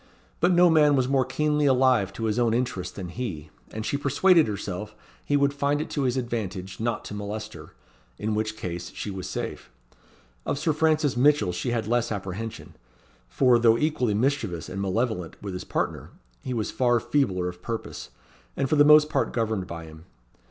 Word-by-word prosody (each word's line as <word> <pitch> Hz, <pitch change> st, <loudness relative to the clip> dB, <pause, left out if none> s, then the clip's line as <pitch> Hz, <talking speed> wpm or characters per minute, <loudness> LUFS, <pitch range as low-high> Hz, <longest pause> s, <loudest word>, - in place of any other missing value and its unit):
But 175 Hz, +3 st, +3 dB
no 175 Hz, 0 st, +6 dB
man 150 Hz, -3 st, +5 dB
was 130 Hz, -2 st, +2 dB
more 135 Hz, -1 st, +2 dB
keenly 150 Hz, +2 st, +1 dB
alive 130 Hz, -7 st, +3 dB
to 105 Hz, -, -6 dB
his 110 Hz, +1 st, 0 dB
own 115 Hz, -2 st, +2 dB
interest 120 Hz, -7 st, -2 dB
than 90 Hz, -3 st, -6 dB
he; 85 Hz, -8 st, -6 dB, 0.2 s
and 110 Hz, 0 st, -6 dB
she 140 Hz, -, 0 dB
persuaded 160 Hz, +4 st, +4 dB
herself 105 Hz, 0 st, -5 dB, 0.3 s
he 145 Hz, -, +1 dB
would 140 Hz, 0 st, +2 dB
find 140 Hz, +1 st, 0 dB
it 155 Hz, -, -4 dB
to 140 Hz, -3 st, -1 dB
his 125 Hz, 0 st, 0 dB
advantage 100 Hz, -7 st, -4 dB
not 115 Hz, -1 st, -2 dB
to -, -, -7 dB
molest 105 Hz, +1 st, -5 dB
her: -, -, -12 dB, 0.4 s
in 110 Hz, 0 st, -2 dB
which 110 Hz, 0 st, -2 dB
case 85 Hz, -2 st, -5 dB
she 105 Hz, -, -4 dB
was 95 Hz, -1 st, -6 dB
safe. -, -, -5 dB, 0.7 s
Of -, -, -2 dB
Sir 155 Hz, +2 st, 0 dB
Francis 155 Hz, -3 st, +2 dB
Mitchell 140 Hz, -6 st, +3 dB
she 90 Hz, +7 st, -3 dB
had 120 Hz, -2 st, -1 dB
less 120 Hz, +1 st, 0 dB
apprehension; 100 Hz, +2 st, -5 dB, 0.6 s
for, 125 Hz, -, +4 dB
though 115 Hz, -1 st, +5 dB
equally 125 Hz, -7 st, 0 dB
mischievous 110 Hz, -, -1 dB
and 95 Hz, +1 st, -4 dB
malevolent 100 Hz, -3 st, -2 dB
with 100 Hz, -2 st, -6 dB
his 90 Hz, -, -5 dB
partner, -, -, -3 dB, 0.3 s
he 130 Hz, -, -5 dB
was 115 Hz, -4 st, -2 dB
far 120 Hz, -2 st, +2 dB
feebler 95 Hz, -11 st, 0 dB
of 90 Hz, 0 st, -7 dB
purpose, 115 Hz, -, -6 dB, 0.5 s
and 135 Hz, -, +1 dB
for 155 Hz, -, +1 dB
the 145 Hz, -, +7 dB
most 150 Hz, 0 st, +7 dB
part -, -, 0 dB
governed 110 Hz, -5 st, -1 dB
by 85 Hz, -2 st, -7 dB
him. 80 Hz, +1 st, -13 dB
115 Hz, 190 wpm, -26 LUFS, 100-140 Hz, 0.7 s, the